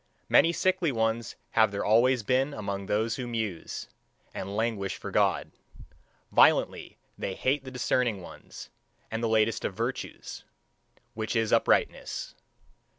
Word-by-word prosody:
Many 165 - +6
sickly 180 -1 +1
ones 115 -1 -1 0.2
have 110 -2 +4
there 100 0 -3
always 120 +3 +4
been 130 +5 +1
among 100 -2 -4
those 110 +2 0
who 125 -2 -4
muse, 110 -7 -4 0.5
and 100 +2 -5
languish 110 -4 -1
for - - -7
God; - - +1 0.8
violently - - +3 0.2
they 95 - -3
hate 135 +2 0
the - - -6
discerning 125 -3 0
ones, 90 - -11 0.4
and 115 +1 -2
the 115 - 0
latest 110 0 +2
of - - -3
virtues, - - -5 0.7
which 110 +1 -3
is 115 -1 +1
uprightness. - - +1
115 Hz, 135 wpm, -28 LUFS, 105-125 Hz, 0.8 s, Many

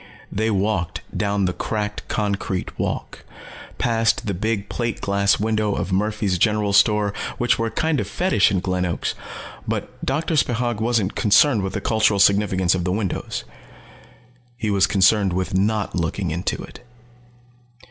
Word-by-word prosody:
They 110 +2 0
walked 100 -4 -1
down 100 -1 0
the 90 - 0
cracked 105 0 -3
concrete 100 -3 -2
walk, - - -3 0.5
passed 115 -1 +1
the 100 - -1
big 105 +2 -2
plate 115 -2 -3
glass 100 0 +2
windows 110 -1 0
of - - -3
Murphy's 100 -1 0
General 105 -1 +2
Store 105 -1 +4 0.2
which 120 -1 +1
were 115 - +1
a - - -2
kind 160 +3 0
of - - -2
fetish 180 - +2
in 95 -3 0
Glen 90 -1 -1
Oaks. 85 -2 -2 0.5
But - - -4
Doctor 155 +4 -1
Spechaug 120 -5 0
wasn't 110 -4 +1
concerned 110 +2 +4
with 95 0 -3
the - - -3
cultural 110 -2 +2
significance 95 -3 +3
of 90 -2 -1
the 90 - -1
windows. 95 -1 -3 1.1
He 110 -3 -1
was 100 -1 +3
concerned 100 0 +3
with 95 +1 -2
not 105 +2 0
looking 85 +1 -2
into 85 +3 -2
it. - - -12
105 Hz, 155 wpm, -22 LUFS, 95-110 Hz, 1.1 s, Store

